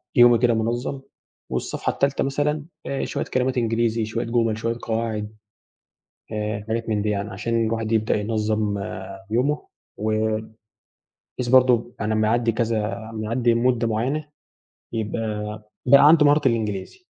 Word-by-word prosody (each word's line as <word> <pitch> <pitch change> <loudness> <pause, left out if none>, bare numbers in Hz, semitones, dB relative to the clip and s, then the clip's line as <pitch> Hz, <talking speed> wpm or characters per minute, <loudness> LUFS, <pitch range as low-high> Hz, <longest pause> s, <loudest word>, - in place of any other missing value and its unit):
يومي 120 -1 +7
كده 120 0 +3
منظم. 120 +4 -2 0.5
والصفحة - - -2
التالتة 140 0 +1
مثلًا 145 +2 -1 0.2
آآ 135 - -2
شوية - - -3
كلمات 130 0 0
إنجليزي، 115 -1 +1
شوية 110 - -3
جُمل، 115 -2 +1
شوية 115 +1 -2
قواعد، 110 -2 -2 1.0
آآ 105 -1 -3
حاجات 115 +1 -2
من 105 -2 +1
دي 105 - -1
يعني، 100 0 -2
عشان 115 +4 -1
الواحد 115 0 -2
يبدأ 110 -1 +2
ينظم 105 -1 0 0.5
يومه، 140 +6 0 0.3
وبحيث 110 +1 -1 1.0
برضه 125 -2 +4
أنا 110 0 0
أما 110 0 +2
يعدي 115 +1 +2
كذا، 110 -1 -2
لما 110 -1 -4
يعدي 120 +2 +2
مدة 120 0 +2
معينة، 135 +8 -1 0.6
يبقى 105 -1 -3 0.2
بقى 140 +3 +8
عنده 155 -2 +6
مهارة 145 -2 +4
الإنجليزي. 110 - -3
115 Hz, 135 wpm, -23 LUFS, 110-120 Hz, 1.0 s, بقى